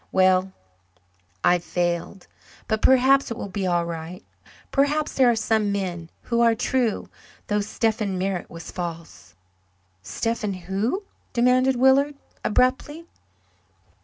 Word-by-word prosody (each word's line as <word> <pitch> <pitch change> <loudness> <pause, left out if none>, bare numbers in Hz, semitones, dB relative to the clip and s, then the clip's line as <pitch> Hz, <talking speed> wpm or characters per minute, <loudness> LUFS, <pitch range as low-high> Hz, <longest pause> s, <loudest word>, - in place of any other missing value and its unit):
Well, 185 0 +3 0.9
I've 175 0 +3
failed. 175 +2 -2 0.4
But 220 -1 -1
perhaps 265 +1 +4
it 230 - -5
will 205 - -5
be 190 0 -2
all 175 -1 +1
right 170 +1 -7 0.5
perhaps 295 +2 +1
there 260 -2 +4
are 235 - +3
some 220 -2 +1
men 180 -4 -3
who 235 -1 0
are 230 -1 +4
true, 240 -1 -1 0.4
though 210 0 0
Stephen 215 -2 -1
Merritt 185 -1 -2
was 165 -1 -9
false." 165 - -7 0.7
"Stephen 210 - -2
who?" 195 - -2 0.3
demanded 255 +2 +3
Willard 265 +3 +4 0.3
abruptly. 260 +8 0
210 Hz, 120 wpm, -24 LUFS, 180-250 Hz, 0.9 s, perhaps